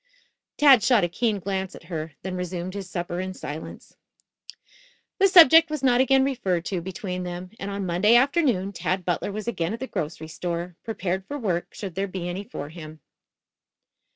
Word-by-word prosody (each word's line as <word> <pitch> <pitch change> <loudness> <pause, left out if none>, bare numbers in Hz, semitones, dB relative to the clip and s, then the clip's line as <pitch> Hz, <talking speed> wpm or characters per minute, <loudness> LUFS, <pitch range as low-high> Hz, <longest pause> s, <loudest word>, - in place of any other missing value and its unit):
Tad 275 -5 +7
shot 235 -3 +4
a - - +3
keen 210 +4 0
glance 190 0 -3
at - - -13
her, 160 -3 -5
then 185 0 -4
resumed 180 0 -4
his 195 -2 -6
supper 175 0 -4
in 185 0 -4
silence. 155 -1 -8 1.2
The 390 - +6
subject 330 -3 +8
was 305 -3 -4
not 250 -1 +4
again 265 0 +4
referred 190 -11 -1
to 185 -3 -2
between 185 +1 -5
them, 180 0 -6
and 195 - -4
on 200 -1 -3
Monday 185 +6 +3
afternoon 250 - +2
Tad 185 0 -2
Butler 180 +3 -1
was 215 +2 -6
again 180 -3 -1
at - - -12
the 260 - -3
grocery 160 - -5
store, 170 +1 -4
prepared 190 -4 -3
for 290 - -4
work 185 -9 -2
should 195 -4 -6
there 195 +3 -2
be 185 -2 -5
any 180 +3 -4
for 145 -7 -7
him. 155 -1 -10
190 Hz, 180 wpm, -25 LUFS, 175-230 Hz, 1.2 s, subject